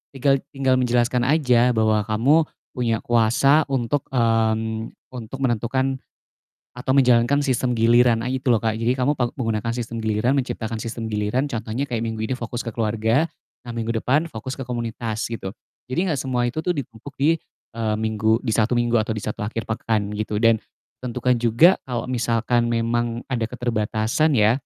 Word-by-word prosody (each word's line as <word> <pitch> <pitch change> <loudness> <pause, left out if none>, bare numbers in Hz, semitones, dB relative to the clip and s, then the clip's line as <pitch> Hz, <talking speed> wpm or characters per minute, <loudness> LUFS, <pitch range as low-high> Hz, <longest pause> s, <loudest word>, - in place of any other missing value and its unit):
tinggal 135 +1 +2 0.2
tinggal 135 -1 +2
menjelaskan 120 0 +1
aja 125 -5 +3
bahwa 110 -1 +2
kamu 115 +7 +3 0.4
punya 120 -3 0
kuasa 120 +6 +4
untuk, 135 +1 -1
mmm, 110 -2 +1 0.2
untuk 125 +1 -7
menentukan 130 +2 0 0.8
atau 130 +1 -1
menjalankan 125 +1 +4
sistem 130 -3 0
giliran, 115 0 +4
nah 125 - -3
itu 130 +1 -3
loh 110 - +1
Kak. 110 -2 0
Jadi 115 +2 +1
kamu 130 +3 0
pa 120 -2 -1
menggunakan 115 -2 -2
sistem 115 -1 -4
giliran, 110 +6 +1
menciptakan 115 -3 -3
sistem 115 0 -5
giliran 105 +7 -1
contohnya 115 +3 -3
kayak 115 -2 -2
minggu 110 -1 -4
ini 130 - 0
fokus 120 0 -4
ke 115 - -5
keluarga, 115 +5 +1 0.4
nah, 120 - -6
minggu 115 -1 -3
depan 150 +8 +1
fokus 115 +4 -6
ke 135 - -7
komunitas, 115 -3 -3
gitu. 115 -4 -5 0.4
Jadi, 170 +9 0
gak 135 - -2
semua 125 -2 0
itu 125 +6 -2
tuh 180 - -3
ditumpuk 135 +1 -8
di, 150 +4 +3 0.4
eee, 110 -2 -1
minggu 110 0 +1
di 110 - 0
satu 115 +3 +2
minggu 120 0 0
atau 110 - -6
di - - -4
satu 105 - -4
akhir 110 +2 -3
pekan 110 -2 -1
gitu, 105 0 -2
dan 115 -1 +3 0.4
tentukan 125 0 -1
juga 120 +11 +5
kalau 120 -2 -3
misalkan 120 0 +1
memang 115 0 -1
ada 115 -3 0
keterbatasan 115 +4 0
ya. 110 -1 +5
120 Hz, 170 wpm, -22 LUFS, 110-130 Hz, 0.8 s, juga